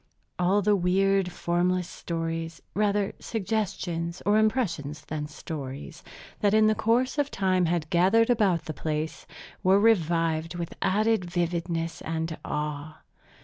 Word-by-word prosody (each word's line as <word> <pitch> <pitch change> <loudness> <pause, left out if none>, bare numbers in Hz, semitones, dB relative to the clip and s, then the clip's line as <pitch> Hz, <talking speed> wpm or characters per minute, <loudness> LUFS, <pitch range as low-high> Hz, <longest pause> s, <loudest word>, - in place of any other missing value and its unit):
All 190 +3 +3
the 210 +1 +4
weird, 195 0 +2
formless 175 +1 0
stories, 165 -2 -4
rather 205 -1 +1
suggestions 190 -6 -2
or 210 +1 +4
impressions 170 - -1
than 150 -1 -4
stories, 145 -1 -7 0.4
that 205 0 +3
in 215 0 +5
the 215 - +4
course 235 +6 +1
of 290 -1 +1
time 185 -5 +1
had 165 -2 0
gathered 195 +7 +4
about 200 -8 +2
the 155 - -4
place, 155 +1 -3 0.3
were 190 +2 +5
revived 165 -6 +2
with 170 -1 -4
added 210 -2 +2
vividness 170 -1 -2
and 160 0 -3
awe. 150 0 -4
175 Hz, 130 wpm, -27 LUFS, 165-205 Hz, 0.4 s, in